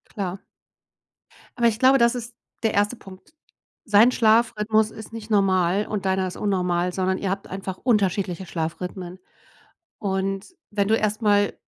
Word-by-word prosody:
Klar. 190 -2 -4 1.1
Aber 235 - +4
ich 220 -1 0
glaube, 265 +1 +6
das 235 0 +3
ist 235 -1 -7 0.3
der 220 - +1
1. 205 +4 +1
Punkt. 195 - -15 0.5
Sein 215 +3 +5
Schlafrhythmus 220 -1 +2
ist 220 0 -10
nicht 225 -1 -8
normal 195 -1 +2
und 205 -2 -3
deiner 190 0 +1
ist 180 - -7
unnormal, 180 -3 0
sondern 185 0 0
ihr 195 - -3
habt 195 +1 -3
einfach 190 0 -6
unterschiedliche 195 -5 0
Schlafrhythmen. 180 +2 -5 0.8
Und 195 - -3 0.2
wenn 200 -1 0
du 220 - +4
erst 215 +1 -1
mal 205 -1 +3
200 Hz, 150 wpm, -23 LUFS, 185-220 Hz, 1.1 s, glaube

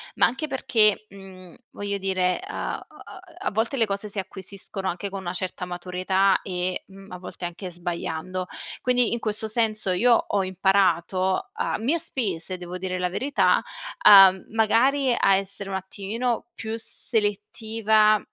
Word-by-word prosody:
ma - - +4
anche 310 +5 -2
perché, 215 -6 +2
mhmm, 190 -3 -13 0.2
voglio 200 0 -3
dire, 185 - 0
a 390 +3 -4
a - - -13
a - - -13 0.3
a - - 0
volte 225 +6 -1
le 230 - +3
cose 200 0 -3
si 205 - -7
acquisiscono 195 0 -6
anche 190 +3 -3
con 195 - -6
una 175 -2 -5
certa 185 0 -4
maturità 185 +2 +1
e, 180 -1 -3
mhmm, 195 0 -14
a 180 - -6
volte 180 0 -10
anche 175 +2 -5
sbagliando. 175 +1 -4 0.3
Quindi, 250 -2 +2
in 235 - -1
questo 220 0 -3
senso 215 -3 0
io 235 +7 +4
ho 205 -3 +1
imparato 190 0 +1
a - - -2
mie 275 +10 0
spese, 195 - -1
devo 180 0 -7
dire 185 0 -3
la 180 0 -1
verità, 270 +9 +2 0.5
uhm, 195 -2 +9
magari 245 +5 +3
a 195 - +5
essere 195 0 -3
un 190 - -3
attimino 215 +6 -3
più 220 0 -5
selettiva, 215 0 +1
195 Hz, 155 wpm, -24 LUFS, 185-220 Hz, 0.5 s, uhm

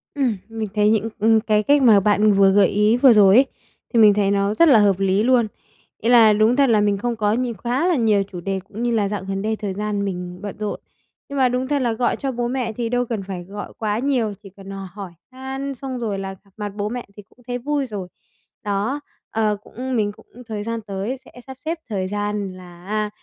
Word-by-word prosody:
Ừm, 255 -8 0
mình 225 -1 -4
thấy 210 0 +4
những, 220 +1 +1
ừm, 225 +1 +4
cái 215 -1 +1
cách 285 +4 +4
mà 220 -5 +7
bạn 210 +1 +3
vừa 195 -1 +5
gợi 200 -1 +5
ý 210 +3 +2
vừa 255 -1 +7
rồi 200 -2 +6
ấy, 265 +2 +7 0.5
thì 230 - +4
mình 210 -2 +7
thấy 200 -1 +1
nó 200 +1 +1
rất 335 +9 +5
là 245 -7 +7
hợp 200 -2 +3
lý 195 +2 +2
luôn. 245 -3 +3 0.5
Ý 230 - 0
là 225 -3 +7
đúng 215 +4 +3
thật 275 -3 +3
là 215 -2 +4
mình 205 -1 +1
không 240 +3 -2
có 210 -1 +1
nhiều 245 0 -1
quá 255 +8 0
là 350 - +3
nhiều 215 -5 +2
chủ 185 -3 -9
đề 195 +1 -2
cũng 225 +3 -6
như 240 - +1
là 210 -3 +1
dạo 205 -2 -4
gần 195 0 -2
đây 220 +1 -1
thời 205 -3 -4
gian 205 0 -2
mình 180 -1 -5
bận 205 -1 -6
rộn. 210 -1 -4 0.5
Nhưng 280 - -5
mà 255 -2 +4
đúng 250 +1 -1
thật 285 -1 0
là 235 -2 +1
gọi 240 +2 0
cho 275 -2 -3
bố 240 -1 -2
mẹ 245 -3 -2
thì 230 0 -3
đâu 245 +1 0
cần 220 -4 -4
phải 185 -2 -6
gọi 205 +3 -8
quá 215 0 -1
nhiều, 250 -6 0
chỉ 195 - -11
cần 195 0 -11
hỏi 195 -1 -8 0.2
han 265 +1 -5
xong 260 -1 -6
rồi 205 -4 -2
là 195 0 -5
gặp 200 - -25
mặt 210 -1 -4
bố 205 0 -2
mẹ 245 +1 -5
thì 205 - -10
cũng - - -27
thấy 245 0 -2
vui 285 +2 -1
rồi. 200 -6 -6 0.6
Đó, 210 +8 -1 0.3
ờ, 215 -2 0
cũng 255 +2 -5
mình 205 -2 +1
cũng - - -19 0.2
thời 210 -2 -4
gian 230 +1 -3
tới 205 +5 -4
sẽ 260 - -19 0.2
sắp 265 -1 -9
xếp 325 +1 -2
thời 190 -3 -2
gian 205 -1 -3
là, 175 -1 -14
a, 210 +1 -1
215 Hz, 250 wpm, -21 LUFS, 200-245 Hz, 0.6 s, mà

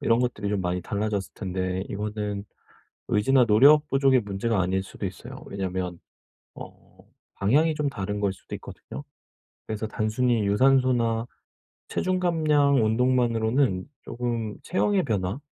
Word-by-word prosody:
이런 115 +1 +2
것들이 115 -5 -2
좀 100 -2 0
많이 90 0 -1
달라졌을 100 0 -2
텐데 95 -1 -3
이거는 105 -1 -4 0.6
의지나 125 +5 +4
노력 145 +8 +6
부족의 135 -2 +3
문제가 105 0 -1
아닐 95 +1 0
수도 95 - -6
있어요. - - -8
왜냐하면 95 -3 -4 0.6
어 - - -10 0.6
방향이 150 +11 +2
좀 150 -1 -1
다른 105 -4 -4
거일 100 -2 +1
수도 - - -10
있거든요. - - -10 0.6
그래서 110 0 -3
단순히 110 +1 0
유산소나 120 0 +2 0.6
체중 185 0 0
감량 150 -7 +3
운동만으로는 115 -2 +1 0.3
금 115 -3 -2
체형의 190 +2 +1
변화 100 - -2
110 Hz, 310 characters per minute, -25 LUFS, 100-130 Hz, 0.6 s, 노력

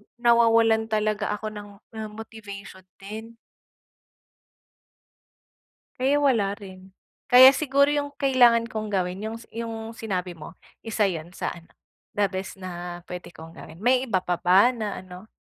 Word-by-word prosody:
nawawalan 230 -2 +4
talaga 215 -1 0
ako 215 +1 -6
ng, 205 -1 -9 0.3
um, 220 -1 -5
motivation 205 -4 -10 0.2
din. 220 +4 -9 2.6
Kaya 270 +3 +2
wala 210 -7 +2
rin. 190 -2 -13 0.3
Kaya 255 +2 +9
siguro 280 +1 +2
'yong 285 -1 -2
kailangan 245 -5 +4
kong 215 -1 -4
gawin 185 -2 -2
'yong 220 +2 -5
s 230 - -11
'yong 225 -1 -5
sinabi 190 -6 -4
mo, 165 0 -11 0.2
isa 220 -1 -1
'yon 175 -2 -3
sa - - -3
ano, 170 -1 -12 0.5
the 205 - +2
best 190 0 -5
na 175 -2 -7
puwede 180 -1 -9
kong 160 +1 -11
gawin. 165 - -12
May 255 +2 +3
iba 190 -5 0
pa 175 -1 -1
ba 190 +7 +5
na 215 -5 -4
ano, 185 +3 -12
215 Hz, 145 wpm, -25 LUFS, 185-230 Hz, 2.6 s, Kaya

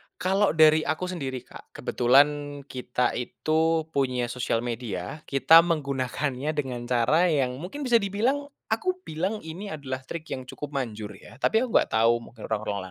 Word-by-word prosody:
kalo 190 0 +1
dari 155 0 +7
aku 155 - -1
sendiri, 135 -8 -4
Kak, - - -15
kebetulan 145 +3 +2
kita 125 -2 -1
itu 160 +5 +1
punya 125 -4 0
sosial 120 -2 -1
media, 115 - -4
kita 150 +4 +7
menggunakannya 140 -2 -1
dengan 125 -4 -3
cara 125 +8 +3
yang 135 -6 0
mungkin 195 - -6
bisa 240 -3 +4
dibilang, 230 +8 0 0.2
aku 365 +11 -1
bilang 185 +7 -3
ini 165 +6 -7
adalah 135 -4 -5
trik 165 -2 -5
yang 130 -1 -5
cukup 140 +2 -7
manjur 110 -6 -3
yah, 115 - -14
tapi 220 - +3
aku 255 - -3
nggak - - +4
tahu 115 +1 +3
mungkin 115 -1 -10
orang-orang 105 -2 -2
140 Hz, 160 wpm, -26 LUFS, 125-165 Hz, 0.2 s, dari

